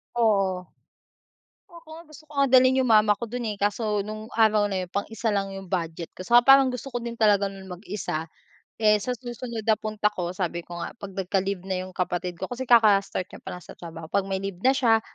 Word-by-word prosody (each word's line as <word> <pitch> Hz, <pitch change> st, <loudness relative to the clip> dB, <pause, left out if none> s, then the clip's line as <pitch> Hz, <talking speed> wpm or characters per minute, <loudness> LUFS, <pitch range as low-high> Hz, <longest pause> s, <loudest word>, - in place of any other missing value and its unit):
Oo. 195 Hz, -5 st, +2 dB, 1.0 s
Ako 335 Hz, -1 st, -16 dB
nga, 335 Hz, -, -11 dB
gusto 310 Hz, +1 st, -14 dB
ko -, -, -15 dB
nga 275 Hz, -1 st, +3 dB
dalhin 260 Hz, +1 st, +6 dB
yung 255 Hz, -, +1 dB
mama 210 Hz, -1 st, +5 dB
ko 235 Hz, -, -5 dB
dun 240 Hz, -1 st, -4 dB
eh, 210 Hz, -, -3 dB
kaso 205 Hz, 0 st, 0 dB
nung 215 Hz, +1 st, -7 dB
araw 215 Hz, -2 st, +3 dB
na 190 Hz, -2 st, -2 dB
yun 175 Hz, -, -16 dB
pang-isa 225 Hz, +3 st, -2 dB
lang 195 Hz, -1 st, -1 dB
yung 195 Hz, -1 st, -9 dB
budget 165 Hz, -2 st, -3 dB
ko -, -, -12 dB
tsaka 240 Hz, +2 st, +5 dB
parang 270 Hz, -1 st, +7 dB
gusto 250 Hz, +2 st, -6 dB
ko 245 Hz, -, -2 dB
din 235 Hz, 0 st, -6 dB
talaga 205 Hz, -3 st, +3 dB
nun 195 Hz, -1 st, -11 dB
mag-isa. 180 Hz, -4 st, -5 dB, 0.5 s
Eh, 210 Hz, -1 st, +4 dB
sa 250 Hz, -, -2 dB
susunod 240 Hz, -2 st, -6 dB
na 220 Hz, -, +6 dB
punta 215 Hz, -1 st, 0 dB
ko 175 Hz, -1 st, -3 dB
sabi 175 Hz, -2 st, -2 dB
ko 175 Hz, 0 st, -9 dB
nga, -, -, -5 dB
'pag 200 Hz, -4 st, -9 dB
nagka-leave 190 Hz, 0 st, -1 dB
na 185 Hz, -1 st, -2 dB
yung -, -, -11 dB
kapatid 180 Hz, -1 st, -2 dB
ko -, -, -2 dB
kasi 255 Hz, +2 st, -3 dB
kaka-start 205 Hz, -5 st, +4 dB
niya -, -, -11 dB
palang 180 Hz, -2 st, -8 dB
sa -, -, -11 dB
trabaho, 165 Hz, -1 st, -9 dB
'pag 195 Hz, -1 st, +1 dB
may 190 Hz, -, 0 dB
leave 195 Hz, -2 st, -5 dB
na 260 Hz, -, +4 dB
siya, 225 Hz, -4 st, +3 dB
205 Hz, 220 wpm, -25 LUFS, 185-235 Hz, 1.0 s, parang